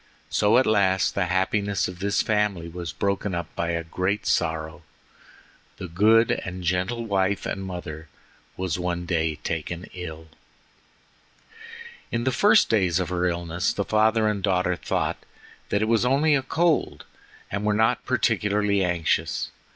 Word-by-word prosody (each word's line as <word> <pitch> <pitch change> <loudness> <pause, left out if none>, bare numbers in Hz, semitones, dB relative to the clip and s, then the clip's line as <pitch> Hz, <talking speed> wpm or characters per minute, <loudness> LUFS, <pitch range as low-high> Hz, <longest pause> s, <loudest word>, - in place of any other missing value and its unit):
So 105 +3 +3
at 130 - +4
last 95 -3 +2
the 95 -3 0
happiness 100 +2 0
of 90 -1 -9
this 100 +1 +1
family 105 -6 0
was 85 -1 -6
broken 100 -1 -1
up 85 - -5
by 85 - -1
a 85 0 -1
great 95 +5 -2
sorrow. 80 +1 -1 1.0
The 95 - -6
good 110 +7 +4
and 90 0 -4
gentle 95 +7 -1
wife 100 -1 0
and 95 - -3
mother 85 -4 -7 0.5
was 90 -2 -2
one 90 -1 -2
day 80 -3 0
taken 85 +2 -4
ill. 80 -3 -8 1.8
In 115 - -1
the 130 - +1
first 210 - +5
days 95 -6 +2
of 90 - -2
her 90 0 0
illness 85 0 -1
the 100 - -2
father 110 0 +3
and 105 -2 -1
daughter 90 -2 +1
thought - - -2 0.5
that 100 - +1
it - - 0
was 115 0 +2
only 140 +5 +3
a 135 - +3
cold, 160 +4 0 0.5
and 100 +1 -2
were 105 - +2
not 110 +2 +2
particularly 105 -1 +1
anxious. 90 -3 0
95 Hz, 150 wpm, -25 LUFS, 85-105 Hz, 1.8 s, first